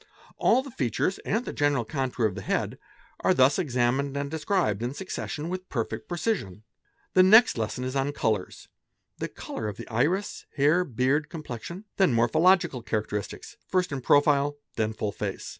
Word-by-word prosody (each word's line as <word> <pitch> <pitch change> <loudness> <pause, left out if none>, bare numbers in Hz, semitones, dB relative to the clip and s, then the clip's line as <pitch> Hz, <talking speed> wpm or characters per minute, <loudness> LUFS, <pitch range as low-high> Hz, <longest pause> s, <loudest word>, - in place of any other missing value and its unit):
All 260 - +3
the 275 - -9
features 135 - -1
and 225 +4 -1
the - - -5
general 145 -5 +1
contour 130 -3 -1
of 105 - +1
the - - -6
head - - -2 0.4
are - - +2
thus 130 +6 +4
examined 135 -2 0
and 140 0 -3
described 160 - 0
in 125 +3 -3
succession 160 -2 -5
with 185 +1 -5
perfect 115 -3 -3
precision. 170 - -2 0.5
'The 185 - +6
next 220 +6 +7
lesson 115 +2 -3
is 130 +1 -3
on 135 +1 +1
colours; 110 -9 -2 0.5
the - - -2
colour 110 - -6
of 105 - -5
the - - -8
iris, 155 - -1
hair, 150 +5 +4
beard, 140 +1 0
complexion; 165 - -7
then 190 -10 +4
morpho 115 +4 +2
logical 180 -7 +4
characteristics, 105 -2 -4
first 185 -2 0
in 140 -2 -3
profile, 145 +1 +3 0.2
then 110 -1 0
full 105 -1 -3
face. - - -5
140 Hz, 170 wpm, -27 LUFS, 120-175 Hz, 0.5 s, next